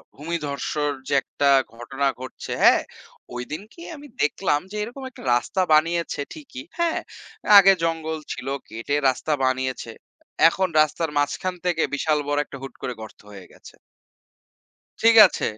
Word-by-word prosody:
ভূমিধসের 150 -1 -3 0.2
যে - - -2
একটা 140 - 0 0.3
ঘটনা 135 +4 -2
ঘটছে, 130 0 -8
হ্যাঁ? - - +6 0.5
ওইদিন 135 +7 -5
কি 340 - -14
আমি 290 0 -12
দেখলাম 150 0 +1
যে, - - -7
এরকম 245 +5 -8
একটা 255 - -14
রাস্তা 120 +9 -1
বানিয়েছে 165 0 +1
ঠিকই, 275 -4 -10 0.2
হ্যাঁ? 340 -1 +1 0.6
আগে 195 -1 +9
জঙ্গল 160 -1 -1 0.2
ছিল 130 - -8 0.2
কেটে 115 +6 -3
রাস্তা 130 +4 -3
বানিয়েছে। 130 -2 -2 0.6
এখন 190 +2 0
রাস্তার 155 +2 0
মাঝখান 145 +6 -1
থেকে 170 -3 +1
বিশাল 150 +1 +1
বড় 145 0 0
একটা - - -10
হুট 135 - -8
করে 125 - -3
গর্ত 110 - -11
হয়ে 95 -3 -11
গেছে। - - -16 1.3
ঠিক 230 0 +6
আছে, - - -4
155 Hz, 145 wpm, -23 LUFS, 135-185 Hz, 1.3 s, আগে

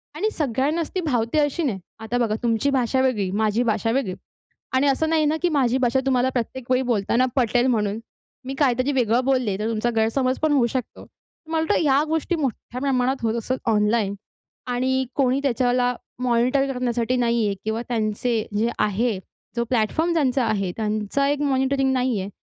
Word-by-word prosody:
आणि 410 +8 0
सगळ्यांनाच 295 - -1
ती 370 - +1
भावते 250 -3 0
अशी 295 +3 0
नाही. 225 -10 -1 0.2
आता 225 +2 -3
बघा 225 -3 +1
तुमची 235 +3 +1
भाषा 260 -1 +1
वेगळी, 225 -8 +1
माझी 215 +3 +1
भाषा 225 -1 0
वेगळी 230 -7 0 0.6
आणि 270 +2 +3
असं 315 +4 +1
नाही 315 -1 +2
ना, 310 +2 +1
की 355 - +2
माझी 260 -5 +2
भाषा 255 0 +2
तुम्हाला 260 -1 +2
प्रत्येक 255 0 -4
वेळी 255 0 +3
बोलताना 230 +3 +2
पटेल 245 0 +2
म्हणून. 215 -3 0 0.5
मी 265 - -4
काहीतरी 255 0 +2
वेगळं 245 -2 +2
बोलले, 255 -7 +1
तर 215 - -1
तुमचा 230 +1 0
गैरसमज 255 +4 +1
पण 310 - +3
होऊ 265 -4 +4
शकतो. 255 - -4
तर 320 - -20
मला 320 -1 +1
वाटतं - - +2
या 280 -1 +3
गोष्टी 320 +2 0
मोठ्या 255 -3 -4
प्रमाणात 265 -1 0
होत 225 0 +1
असतात 255 +3 -2 0.2
ऑनलाईन. 210 -1 +1 0.5
आणि 260 +1 0
कोणी 265 -1 +2
त्याच्याला 250 -1 +1 0.3
मॉनिटर 255 +3 +2
करण्यासाठी 250 -1 -1
नाही 235 -2 +1
आहे 200 -1 0
किंवा 220 +1 -1
त्यांचे 220 0 -1
जे 225 +3 +2
आहे, 215 +1 +1 0.4
जो 235 - +1
प्लॅटफॉर्म 260 +9 +1
ज्यांचा 265 -5 +1
आहे, 200 -4 0
त्यांचं 215 +4 -1
एक 290 +1 0
मॉनिटरिंग 270 -1 +1
नाही 250 -4 0
आहे. 190 - -5
250 Hz, 180 wpm, -23 LUFS, 225-270 Hz, 0.6 s, होऊ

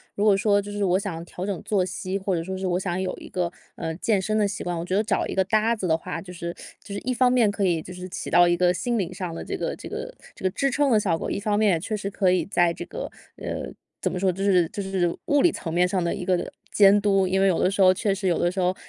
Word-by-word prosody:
如 200 - -1
果 210 -2 +5
说 205 -1 +3
就 205 +1 -8
是 205 0 -2
我 185 -1 +3
想 195 -4 -4
要 165 - -6
调 175 +1 -7
整 195 -3 -2
作 200 -3 +1
息， 185 +1 -3
或 190 -1 -1
者 165 - -2
说 190 +2 -4
是 190 0 -3
我 180 0 +1
想 180 -1 -2
有 185 - -2
一 - - -10
个， 175 -2 -2 0.3
呃， 160 0 -3
健 200 +3 +1
身 215 +3 0
的 210 -1 +3
习 200 - -5
惯， 175 -1 -2
我 165 - -4
觉 185 - -1
得 205 - +4
找 220 - 0
一 - - -4
个 190 - +2
搭 215 +4 +2
子 195 -4 -3
的 160 -1 +3
话， 180 +2 -6
就 185 - -10
是 170 -1 -5 0.3
就 200 - -8
是 200 - -3
一 255 +1 -1
方 250 +1 +4
面 235 -4 +4
可 205 0 -2
以 170 -3 +1
就 180 - -10
是 180 0 -7
起 185 - -5
到 175 +1 +6
一 175 - +3
个 175 0 +3
心 240 +7 -1
理 190 -4 -2
上 180 -2 -5
的 - - -6
这 - - -4
个 - - -2
这 - - -9
个 - - -6 0.2
这 - - -13
个 185 - +2
支 275 +8 0
撑 280 +1 +2
的 220 - +5
效 180 -6 +1
果， - - -4
一 - - -1
方 205 0 0
面 210 -1 +4
也 165 - +1
确 215 +6 -3
实 200 - -4
可 190 -1 +2
以 180 -3 +1
在 175 -3 +2
这 - - -6
个， - - -6 0.3
呃， - - -5 0.3
怎 - - 0
么 180 - -3
说， 190 0 +2
就 195 +2 -4
是 180 -4 +3
就 200 - -5
是 185 -3 0
物 290 -1 +3
理 345 - +5
层 165 - -5
面 180 +1 +3
上 185 -1 0
的 170 - 0
一 185 - -5
个 180 -1 0 0.2
监 205 0 +6
督。 195 -2 +3
因 190 +1 +1
为 195 - +4
有 185 - +2
的 185 - +2
时 200 - 0
候 185 -1 +8
确 195 +2 0
实 195 0 -2
有 175 - +2
的 175 - +1
时 190 - -4
候， 180 0 +1
190 Hz, 345 characters per minute, -25 LUFS, 180-205 Hz, 0.3 s, 候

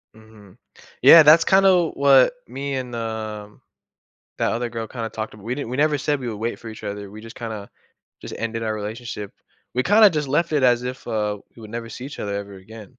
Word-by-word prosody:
Mhm, 110 -2 -18 0.4
yeah. 165 -1 +9
That's 160 +2 +7
kinda 190 -3 +4
what 140 - +5
me 140 +2 -4
and, 125 -2 -5
um, 110 -2 -6 0.8
that - - 0
other 120 +1 -2
girl 115 -1 -5
kinda 115 -2 -5
talked 110 0 -6
ab 105 - -14
we 115 +5 -4
didn't 140 -4 -5
we 125 - -4
never 150 0 +2
said 145 +1 -1
we 125 - -5
would 115 - -4
wait 115 +2 -3
for 115 - -9
each 110 - -11
other, 100 -1 -6
we 110 +2 -11
just 115 0 -12
kinda 110 -4 -7 0.5
just - - -8
ended 115 0 -3
our 110 -1 -1
relationship. 105 0 -6 0.4
We 125 - 0
kinda 210 +4 +6
just 150 -4 -2
left 160 +5 0
it 150 -3 +1
as 125 -1 +3
if 125 +1 -6
uh, 105 -1 -2 0.2
we 115 - -14
would 110 0 -11
never 115 0 -6
see 125 +3 -8
each 140 - -9
other 100 -1 -3
ever 100 0 -6
again. 105 +3 -13
115 Hz, 220 wpm, -22 LUFS, 110-135 Hz, 0.8 s, yeah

